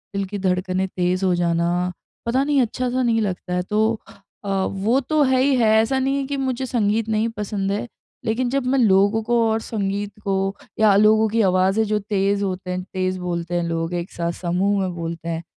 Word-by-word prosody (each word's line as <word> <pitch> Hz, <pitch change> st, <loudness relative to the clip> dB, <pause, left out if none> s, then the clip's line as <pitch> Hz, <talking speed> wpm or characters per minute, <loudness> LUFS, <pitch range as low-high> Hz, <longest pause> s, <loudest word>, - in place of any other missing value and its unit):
दिल 200 Hz, 0 st, 0 dB
की 205 Hz, +2 st, -5 dB
धड़कनें 185 Hz, 0 st, 0 dB
तेज़ 185 Hz, +1 st, -1 dB
हो 185 Hz, -, +3 dB
जाना, 175 Hz, +1 st, 0 dB, 0.3 s
पता 250 Hz, +3 st, +1 dB
नहीं 285 Hz, -1 st, +2 dB
अच्छा-सा 250 Hz, +2 st, -1 dB
नहीं 230 Hz, -2 st, +2 dB
लगता 185 Hz, -3 st, -3 dB
है। 180 Hz, -, +1 dB
तो 220 Hz, +3 st, +1 dB, 0.4 s
अ, 200 Hz, -, -5 dB, 0.2 s
वो 210 Hz, +7 st, +1 dB
तो 300 Hz, +3 st, 0 dB
है 260 Hz, -1 st, +3 dB
ही 275 Hz, 0 st, +3 dB
है 235 Hz, -3 st, +3 dB
ऐसा 235 Hz, +4 st, 0 dB
नहीं 270 Hz, +1 st, 0 dB
है 275 Hz, -, -1 dB
कि 280 Hz, 0 st, -3 dB
मुझे 265 Hz, -1 st, -2 dB
संगीत 225 Hz, -2 st, 0 dB
नहीं 220 Hz, +1 st, +1 dB
पसंद 200 Hz, -1 st, -2 dB
है 205 Hz, +4 st, -2 dB, 0.4 s
लेकिन 240 Hz, +3 st, 0 dB
जब 270 Hz, 0 st, -1 dB
मैं 270 Hz, +2 st, +2 dB
लोगों 205 Hz, 0 st, +4 dB
को 240 Hz, +2 st, 0 dB
और 220 Hz, 0 st, +1 dB
संगीत 205 Hz, -2 st, -3 dB
को 195 Hz, -, -1 dB, 0.5 s
या 215 Hz, -2 st, +5 dB
लोगों 215 Hz, +2 st, +5 dB
की 225 Hz, +2 st, +1 dB
आवाज़ें 190 Hz, +2 st, +3 dB
जो 210 Hz, 0 st, 0 dB
तेज़ 200 Hz, -1 st, 0 dB
होते 185 Hz, -1 st, -3 dB
हैं, 180 Hz, 0 st, -2 dB
तेज़ 185 Hz, 0 st, -1 dB
बोलते 175 Hz, -1 st, -3 dB
हैं 175 Hz, -, +1 dB
लोग, 165 Hz, 0 st, -2 dB
एक 175 Hz, +1 st, -3 dB
साथ 170 Hz, 0 st, -2 dB
समूह 185 Hz, +3 st, +1 dB
में 185 Hz, -1 st, -2 dB
बोलते 170 Hz, 0 st, -5 dB
हैं, 165 Hz, 0 st, -3 dB
200 Hz, 210 wpm, -22 LUFS, 185-230 Hz, 0.5 s, या